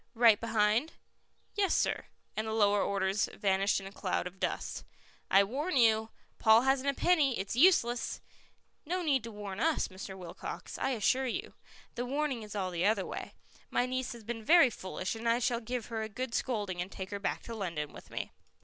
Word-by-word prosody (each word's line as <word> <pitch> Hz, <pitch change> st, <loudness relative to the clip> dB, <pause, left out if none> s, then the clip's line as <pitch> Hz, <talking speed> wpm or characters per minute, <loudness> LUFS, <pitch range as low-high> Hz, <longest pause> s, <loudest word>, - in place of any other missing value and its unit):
"Right 225 Hz, -3 st, +6 dB
behind?" 225 Hz, +5 st, +2 dB, 0.6 s
"Yes, 395 Hz, -2 st, +2 dB
sir." -, -, 0 dB, 0.3 s
And 215 Hz, +1 st, -2 dB
the 220 Hz, -, -2 dB
lower 205 Hz, -2 st, +3 dB
orders 195 Hz, +1 st, 0 dB
vanished 195 Hz, 0 st, +2 dB
in 195 Hz, -, -10 dB
a 195 Hz, -, -7 dB
cloud 190 Hz, -3 st, -2 dB
of 180 Hz, +1 st, -8 dB
dust. -, -, -2 dB, 0.5 s
"I 195 Hz, +1 st, +6 dB
warn 280 Hz, -, -2 dB
you: 220 Hz, -2 st, +4 dB, 0.3 s
Paul 220 Hz, 0 st, +6 dB
hasn't 270 Hz, +1 st, +2 dB
a 280 Hz, -, 0 dB
penny; 300 Hz, -8 st, +3 dB
it's 195 Hz, +4 st, -3 dB
useless." 245 Hz, -6 st, +3 dB, 0.6 s
"No 360 Hz, +3 st, -2 dB
need 275 Hz, -7 st, +2 dB
to 230 Hz, -, -7 dB
warn 205 Hz, -2 st, -6 dB
us, 320 Hz, +4 st, +1 dB
Mr. 190 Hz, 0 st, -8 dB
Wilcox, 180 Hz, -2 st, -7 dB
I -, -, 0 dB
assure 255 Hz, +4 st, +2 dB
you. 380 Hz, -, -4 dB, 0.4 s
The 245 Hz, +1 st, -3 dB
warning 280 Hz, -2 st, -1 dB
is 210 Hz, -1 st, -8 dB
all 190 Hz, -2 st, -1 dB
the 175 Hz, 0 st, -1 dB
other 205 Hz, -1 st, +2 dB
way. -, -, -6 dB, 0.3 s
My 245 Hz, -, +1 dB
niece 255 Hz, 0 st, -2 dB
has 235 Hz, -2 st, -11 dB
been 225 Hz, 0 st, -5 dB
very 325 Hz, -1 st, +6 dB
foolish, 185 Hz, -2 st, -4 dB
and 230 Hz, +1 st, -2 dB
I 230 Hz, -, +4 dB
shall 240 Hz, -1 st, +1 dB
give 245 Hz, 0 st, -3 dB
her 220 Hz, -, -1 dB
a 220 Hz, -, -4 dB
good 250 Hz, +3 st, -4 dB
scolding 205 Hz, -9 st, -1 dB
and 185 Hz, +2 st, -5 dB
take 190 Hz, +1 st, -7 dB
her 200 Hz, -, -3 dB
back 200 Hz, -, -2 dB
to 230 Hz, -, -7 dB
London 170 Hz, -9 st, -4 dB
with -, -, -12 dB
me." -, -, -5 dB
225 Hz, 200 wpm, -31 LUFS, 200-255 Hz, 0.6 s, Right